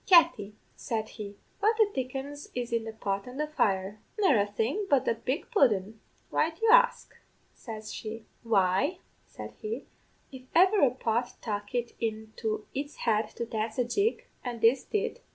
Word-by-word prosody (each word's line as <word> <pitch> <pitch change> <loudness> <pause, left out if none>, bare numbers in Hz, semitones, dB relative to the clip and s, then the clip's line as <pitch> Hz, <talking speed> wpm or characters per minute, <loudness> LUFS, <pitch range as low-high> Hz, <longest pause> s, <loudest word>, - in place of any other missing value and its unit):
"'Katty,' 330 - +5 0.2
said 220 -3 -3
he, 205 -1 -8 0.2
'what 435 +2 +3
the 440 -2 +5
dickens 270 +3 -4
is 240 -1 -3
in 230 -1 0
this 220 -1 -6
pot 195 +1 -2
on 250 +1 -8
the 300 - 0
fire?' 205 -8 0 0.2
"'Nerra 265 - +4
thing 230 - -1
but 280 -3 +4
the - - +3
big 255 - -3
pudden. 220 - +2 0.3
Why 315 - +2
do 325 - -14
you 450 - +6
ax?' - - +5 0.5
says 220 -3 -8
she. 220 0 -6 0.2
"'Why,' 195 - +2 0.3
said - - -9
he, 435 +1 -4 0.5
'if 260 -2 -9
ever 380 +4 +6
a 275 - +6
pot 240 -1 -1
tuck 205 +1 -4
it 240 -1 -1
into 220 -1 -3
its 285 +2 -4
head 215 -2 +2
to 235 - -3
dance 220 -1 -3
a 250 - +3
jig, 400 - 0 0.2
and 240 -2 -4
this 245 +3 +5
did. 425 +2 -2
235 Hz, 170 wpm, -29 LUFS, 215-300 Hz, 0.5 s, you